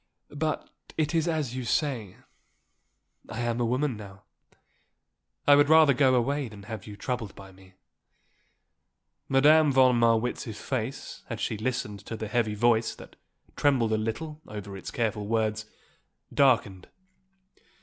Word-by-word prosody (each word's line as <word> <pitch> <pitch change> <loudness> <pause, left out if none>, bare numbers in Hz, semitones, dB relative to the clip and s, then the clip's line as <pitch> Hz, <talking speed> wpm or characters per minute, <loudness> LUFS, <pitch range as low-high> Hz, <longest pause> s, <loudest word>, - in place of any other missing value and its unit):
But 155 +1 -2 0.3
it 155 -1 0
is 165 0 +1
as 155 -7 -1
you 130 - -3
say, 120 - -1 1.1
I 110 - -4
am 120 0 -1
a 120 - +1
woman 130 +2 0
now. 100 -2 -11 1.2
I 145 - +8
would 145 0 +4
rather 160 -3 +7
go 130 0 +4
away 135 +3 0
than 105 -3 -12
have 105 0 -8
you 105 - -8
troubled 115 -2 -4
by 95 -1 -12
me." 95 0 -19 1.5
Madame 150 +3 +5
von 130 -2 +5
Marwitz's 115 -1 +1
face, 130 +1 -4
as 115 -3 -4
she 115 - -2
listened 110 -2 -3
to 115 - -5
the 110 - -5
heavy 110 -1 0
voice, 115 +1 +2
that - - -14 0.4
trembled 125 -6 +2
a - - +2
little 150 +8 -4
over 100 -2 -7
its 95 - -7
careful 110 -3 -2
words, 110 -1 -1 0.7
darkened. 115 -9 +2
120 Hz, 140 wpm, -27 LUFS, 110-140 Hz, 1.5 s, I